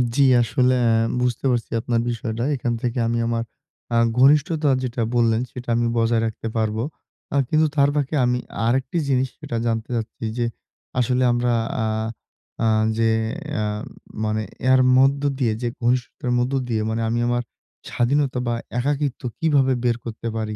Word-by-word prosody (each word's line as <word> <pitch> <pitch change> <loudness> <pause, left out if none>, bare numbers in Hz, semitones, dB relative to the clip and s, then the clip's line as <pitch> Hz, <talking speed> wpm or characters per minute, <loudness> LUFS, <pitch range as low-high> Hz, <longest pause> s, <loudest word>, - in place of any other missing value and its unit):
জ্বি, 140 - +5 0.2
আসলে 125 +2 +2 0.5
বুঝতে 125 +1 -1
পারছি 120 -2 -2
আপনার 115 0 0
বিষয়টা। 115 0 -3
এইখান 120 -3 -1
থেকে 120 0 -2
আমি 115 - 0
আমার 115 0 0 0.5
আ - - +4 0.2
ঘনিষ্ঠতা 150 +3 +4
যেটা 120 -1 -2
বললেন 115 -1 +3
সেটা 125 -1 -8
আমি 120 0 +1
বজায় 115 0 +2
রাখতে 115 0 -4
পারবো। 110 +1 0 0.5
আ - - 0
কিন্তু 155 0 +3
তার 140 -1 +4
ফাকে 145 +1 0
আমি 125 0 +1 0.3
আরেকটি 130 +7 0
জিনিস 130 0 +2
সেটা 115 - -4
জানতে 115 -1 -2
চাচ্ছি 115 0 -4
যে, 120 - +1 0.5
আসলে 125 +1 +2
আমরা 120 0 +1 0.3
আ - - 0 0.8
আ - - +3 0.3
যে 115 0 +3 0.5
আ - - 0 0.6
মানে 110 0 0 0.3
এর 130 - +6 0.2
মধ্য 135 +2 +4 0.2
দিয়ে 120 -5 +2
যে 120 - -1
ঘনিষ্ঠতার 125 +2 -1
মধ্য 125 +2 0
দিয়ে 110 -3 0
মানে 115 +1 -1
আমি 120 - 0
আমার 120 0 0 0.5
স্বাধীনতা 130 +1 +1
বা 120 - +1 0.3
একাকিত্ব 140 0 -1 0.2
কিভাবে 140 -5 +3
বের 120 -1 +2
করতে 115 0 -5
পারি? 110 -1 -3
120 Hz, 160 wpm, -22 LUFS, 115-130 Hz, 0.8 s, এর